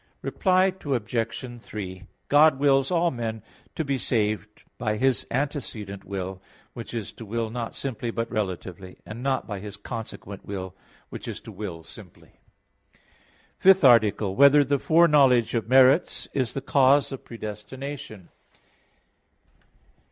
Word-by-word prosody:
Reply 185 0 +2
Obj. 120 -1 -3
3: 95 -5 -7 0.2
God 145 -1 +5
wills 135 -1 +3
all 170 -1 +2
men 115 -3 -4 0.3
to 160 - -2
be 135 -1 -1
saved 105 -3 -2 0.2
by 110 -3 -1
His 130 +1 +1
antecedent 120 -8 -4
will, 95 -1 -5 0.3
which 120 0 -8
is 110 -4 -4
to - - -11
will 110 +1 -3
not 115 -1 -5
simply 125 -3 -4
but 115 0 -2
relatively; 95 -2 -4
and 110 +3 -8
not 135 0 0
by 105 -2 -5
His 105 +1 -8
consequent 105 -2 -8
will, 95 -2 -6 0.3
which - - -8
is - - -5
to - - -10
will 95 -5 -7
simply. - - -14 0.6
_______________________ - - -29 0.6
FIFTH 190 -1 +6
ARTICLE 110 -5 +5
[I, - - -4
Q. - - -9
23, 140 - +6
Art. 140 - +9
5] - - -5
Whether 145 -1 +6
the 140 0 0
Foreknowledge 145 -8 +4
of 115 -2 -2
Merits 135 +5 +4
Is 130 -5 -1
the 135 - -2
Cause 140 +1 +3
of 135 - -7
Predestination? 115 0 -8
115 Hz, 150 wpm, -25 LUFS, 105-135 Hz, 0.6 s, Art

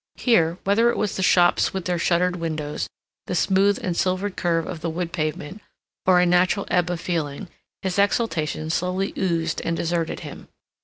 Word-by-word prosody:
Here, 170 -9 +2
whether 220 +4 +3
it - - -1
was 210 -2 -1
the - - -2
shops 175 0 +3
with 190 -3 -3
their 180 -1 -1
shuttered 180 +1 +1
windows, 155 -3 -3 0.4
the - - -2
smooth 195 +3 +3
and 180 -2 -1
silvered 185 +2 -1
curve 165 -2 0
of 170 -4 -6
the 170 - -2
wood 170 +1 -4
pavement, 155 +4 -3 0.5
or 180 -1 +6
a 180 - +4
natural 180 +3 +2
ebb 180 -1 +2
of 175 -2 -2
feeling, 165 0 -3 0.3
his 190 0 -1
exaltation 160 -7 0
slowly 180 +3 -1
oozed 165 -3 -1
and 165 0 -1
deserted 170 -1 -2
him. - - -9
180 Hz, 175 wpm, -23 LUFS, 165-190 Hz, 0.5 s, or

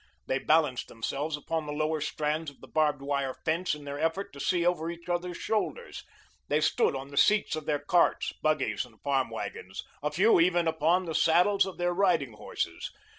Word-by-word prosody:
They 130 - 0
balanced 150 -5 +2
themselves 145 +7 -3
upon 160 +1 -3
the - - -3
lower 155 +1 -1
strands 155 +1 -2
of 140 - -19
the - - -13
barbed 150 -3 +1
wire 140 -2 -1
fence 165 +1 0
in 150 - -11
their 140 0 -6
effort 175 +6 -1
to 140 - -11
see 175 +4 +1
over 175 -2 +1
each 170 0 -8
others' 175 0 -2
shoulders; 345 - -3 0.4
they 150 - +2
stood 150 - +2
on 135 +1 -6
the 140 - -10
seats 210 -2 +4
of 155 -1 -6
their 150 - +2
carts, 155 +5 +2
buggies, 155 0 +1
and 115 -3 -17
farm 135 -2 +1
wagons, 95 +1 -6 0.2
a 150 - 0
few 185 +7 +4
even 175 0 +3
upon 160 +3 +2
the 165 - -4
saddles 180 +6 +4
of 190 - -7
their 175 0 0
riding 175 - +2
horses. 105 - -4
155 Hz, 195 wpm, -29 LUFS, 145-175 Hz, 0.4 s, seats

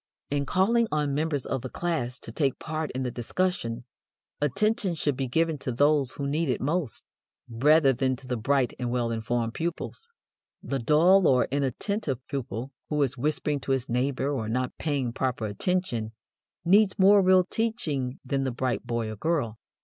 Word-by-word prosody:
In 140 -1 0
calling 225 - +3
on 150 -2 0
members 150 -2 -1
of 130 - -2
the 130 - -6
class 130 -8 -2
to - - -8
take 135 +1 0
part 160 -1 -3
in 130 +1 -2
the 125 - -2
discussion, 120 -2 -2 0.6
attention 195 - +1
should 145 -3 0
be 135 0 -2
given 160 +3 +1
to 130 - -3
those 145 +1 +2
who 140 - -4
need 150 +2 0
it 125 - 0
most, 150 -2 -2 0.4
rather 135 +4 +4
than 130 +1 0
to 130 - -12
the 125 -1 -2
bright 130 +2 +1
and 125 -1 -2
well 120 -1 0
informed 115 +1 -1
pupils. 170 - -4 0.6
The 135 - -2
dull 165 +9 +5
or 125 -1 +4
inattentive 140 - -1
pupil, 130 -2 -4 0.2
who 150 - 0
is 130 -2 -1
whispering 150 +2 0
to 135 - -1
his 130 -1 -1
neighbor 130 +3 0
or 115 -6 -2
not 125 +2 -1
paying 140 -6 -1
proper 125 -4 -1
attention, 115 - -1 0.5
needs 195 +3 +4
more 200 +1 +6
real 185 0 +5
teaching 170 - -2
than 135 +1 0
the 135 - 0
bright 125 0 -2
boy 115 -1 -1
or - - -6
girl. 115 -4 -1
140 Hz, 175 wpm, -27 LUFS, 125-160 Hz, 0.6 s, more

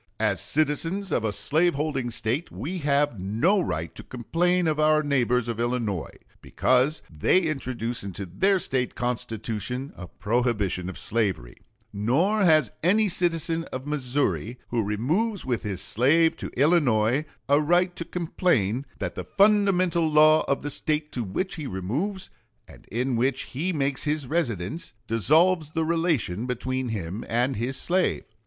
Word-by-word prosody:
As - - +1
citizens 165 +6 0
of 115 - +1
a 110 - 0
slave 150 - +1
holding 140 -4 -2
State, 120 +7 -2
we 175 +7 -5
have 145 - +1
no 115 - +2
right 80 - -3
to - - -9
complain 175 +8 0
of 155 -1 0
our 155 0 +4
neighbors 125 -4 +1
of 115 -1 -3
Illinois, 120 -7 -2 0.2
because 130 +4 +1
they 80 - +3
introduce 130 - -3
into 100 0 -5
their 190 - +2
State 130 -8 -1
Constitution 120 +1 -3
a 90 - -9
prohibition 105 -4 -1
of 95 - -8
slavery; 100 - -1 0.4
nor 150 - +1
has 155 - +4
any 205 +5 +3
citizen 165 -2 0
of 130 +1 -7
Missouri 125 - -1
who 120 -1 0
removes 155 - -1
with 125 -3 -1
his 95 -3 -4
slave 155 +11 +3
to - - -6
Illinois 135 -4 +3 0.2
a 145 +2 +4
right 175 +3 +2
to 170 - -3
complain 145 - 0
that - - -3
the - - -5
fundamental 185 -5 +3
law 155 +1 +6
of 140 - 0
the 145 - -3
State 150 +1 -1
to 120 - -3
which 175 - -3
he 150 -3 -5
removes, 140 - -3 0.4
and - - -16
in 125 +3 -1
which 130 +2 0
he 160 +8 -3
makes 140 -4 -1
his 150 -1 -1
residence, 135 - -2
dissolves 155 - +3
the 160 0 -1
relation 155 - 0
between 130 +1 -2
him 100 -1 -4
and 125 +3 +1
his 120 +5 -3
slave. 180 +1 0
135 Hz, 150 wpm, -25 LUFS, 115-165 Hz, 0.4 s, law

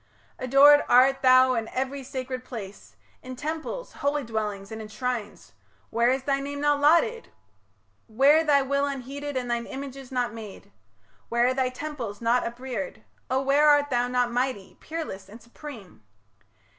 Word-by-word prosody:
Adored 280 +3 +6
art 260 +2 +5
thou 255 0 +6
in 225 -2 -2
every 270 +3 -3
sacred 255 -1 -5
place, 205 -6 -9 0.3
In 255 0 -8
temples, 315 - -5
holy 285 +1 -1
dwellings, 210 -3 -4
and 220 0 -6
in 215 - -8
shrines, 215 - -5 0.4
Where 235 +2 +2
is 260 +1 0
thy 275 0 0
name 285 +1 -5
not 290 -1 +2
lauded? 395 +11 +3 0.8
where 275 +8 +4
thy 285 -3 +3
will 280 +1 0
Unheeded, 280 +1 -5
and 245 -1 -3
thine 235 0 -2
images 270 -1 -8
not 245 -3 -1
made? 220 -3 -10 0.6
Where 235 +1 +2
are 255 - +2
thy 260 -1 0
temples 255 -6 -6
not 235 +2 +2
upreared? 235 -4 -6 0.3
O, 260 +1 +1
where 285 +2 +4
Art 290 -1 +3
thou 245 0 +1
not 250 -1 0
mighty, 245 -5 -2
peerless, 305 -12 -6
and 220 +3 -12
supreme? 235 - -12
255 Hz, 155 wpm, -26 LUFS, 235-280 Hz, 0.8 s, Adored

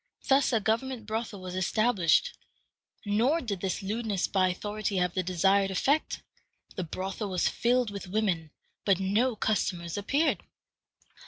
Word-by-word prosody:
Thus 270 0 +4
a 230 - +3
government 230 +2 -1
brothel 220 -2 -4
was 185 -1 -6
established. 215 - +2 0.7
Nor 230 +10 +2
did 210 - -4
this 190 +1 -2
lewdness 210 -2 -1
by 190 -2 +2
authority 205 +2 -3
have 180 -1 +1
the 185 - 0
desired 195 +2 +2
effect. 275 - 0 0.5
The 185 - -2
brothel 190 +5 -4
was 185 -2 +1
filled 245 -2 +1
with 200 -1 -7
women, 180 -5 0 0.3
but 195 -3 +3
no 215 +6 +1
customers 180 -6 -1
appeared. 285 +10 +1
205 Hz, 140 wpm, -29 LUFS, 185-230 Hz, 0.7 s, Thus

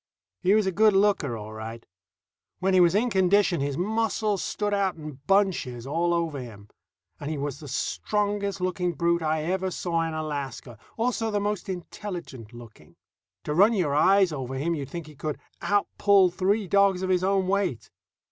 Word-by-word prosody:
He 195 +2 +4
was 215 -2 +3
a 190 - +1
good 215 +3 +4
looker 195 - +2
all 110 0 -8
right. 110 +1 -8 0.7
When 190 +1 0
he 185 - +5
was 175 0 +5
in 235 +3 +2
condition 190 -3 +3
his 140 0 -2
muscles 215 0 0
stood 205 -1 -2
out 195 -2 +1
in 155 -4 -9
bunches 185 - +1
all 170 +5 0
over 165 -4 -1
him. 105 -5 -10 0.5
And 145 - -5
he 155 - -3
was 140 -1 -4
the 150 - -10
strongest 200 +7 -1
looking 180 -1 -1
brute 170 0 +1
I 155 -1 0
ever 185 +3 -1
saw 170 -2 -1
in 165 -1 -2
Alaska, 140 -6 -5 0.2
also 225 -1 0
the 205 -1 0
most 205 -1 -3
intelligent 175 - -7
looking. 115 -10 -14 0.5
To 150 - -2
run 200 +8 +5
your 175 -9 0
eyes 190 +4 +4
over 135 -3 -5
him, 155 +6 -1
you'd 140 -4 -4
think 170 +1 -6
he 155 - -13
could 150 +1 -4 0.2
outpull 200 -2 +3
three 195 +3 0
dogs 195 -1 +3
of 185 - 0
his 180 0 +2
own 190 -1 +1
weight. 190 - -1
180 Hz, 180 wpm, -26 LUFS, 145-200 Hz, 0.7 s, he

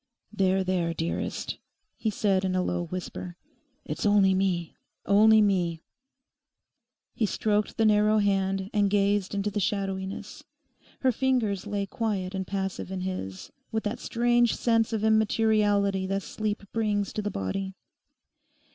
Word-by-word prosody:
'There, 190 -2 +2
there, 175 -3 0
dearest,' 165 +1 -3 0.4
he 220 - -1
said 195 -2 +1
in 185 -1 0
a 185 - +1
low 175 -1 -1
whisper, 180 0 -6 0.5
'it's - - -4
only 205 -2 +4
me, 185 -3 0 0.3
only 215 +2 +6
me.' 175 -5 0 1.3
He 220 - 0
stroked 210 +1 0
the 225 - +3
narrow 210 0 +4
hand 195 -1 0
and 205 -1 +3
gazed 200 -1 +1
into 200 +1 -1
the 205 - -1
shadowiness. 195 -1 -3 0.6
Her 260 - +4
fingers 230 -6 0
lay 205 -1 -1
quiet 195 -3 -2
and 190 -1 -3
passive 195 -1 -3
in 190 -1 -3
his, 180 - -5 0.2
with 220 -1 -1
that 210 +2 -3
strange 240 0 +2
sense 225 -1 +2
of 220 -2 -1
immateriality 210 -3 +2
that 195 0 -1
sleep 215 -1 -3
brings 210 -3 0
to 215 - -2
the 205 - -2
body. 190 - -3
200 Hz, 140 wpm, -27 LUFS, 190-215 Hz, 1.3 s, only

